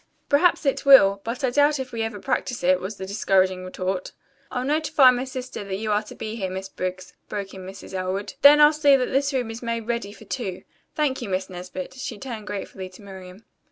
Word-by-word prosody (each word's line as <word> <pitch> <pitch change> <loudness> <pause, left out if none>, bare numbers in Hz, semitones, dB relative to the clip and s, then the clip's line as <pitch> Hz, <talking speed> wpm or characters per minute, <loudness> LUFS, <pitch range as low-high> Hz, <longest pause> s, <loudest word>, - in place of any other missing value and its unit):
"Perhaps 315 +3 +3
it 275 - +1
will, 200 -8 +7
but 235 +5 -5
I 255 - +2
doubt 290 +3 +3
if 260 -1 -5
we 230 - -3
ever 225 -2 -3
practise 250 +1 -2
it," 180 +1 +4
was 190 +4 -5
the 190 - -6
discouraging 190 -2 +1
retort. 185 0 -4 0.4
"I'll 250 -1 -3
notify 300 -2 +5
my 250 +1 -2
sister 255 -4 -6
that 195 -1 -4
you 215 +2 -3
are 210 0 +2
to 215 - -12
be 220 +1 -5
here, 190 -4 -2
Miss 190 +1 -6
Briggs," 185 0 -5 0.2
broke 200 -2 -5
in 185 -1 -9
Mrs. 195 0 -10
Elwood. 190 +2 -3
"Then 290 +1 +9
I'll 295 +1 +7
see 290 -2 +5
that 255 -2 0
this 275 +2 +1
room 250 -4 -2
is 225 - -8
made 230 -1 -2
ready 235 -3 -2
for - - -14
two. 195 -8 -5 0.3
Thank 290 -5 0
you, 235 - -5
Miss 185 0 -2
Nesbit." 180 0 -7
She 260 -4 -6
turned 225 -4 -7
gratefully 190 -2 -6
to 185 - -16
Miriam. 190 +1 -11
215 Hz, 225 wpm, -24 LUFS, 190-260 Hz, 0.4 s, Then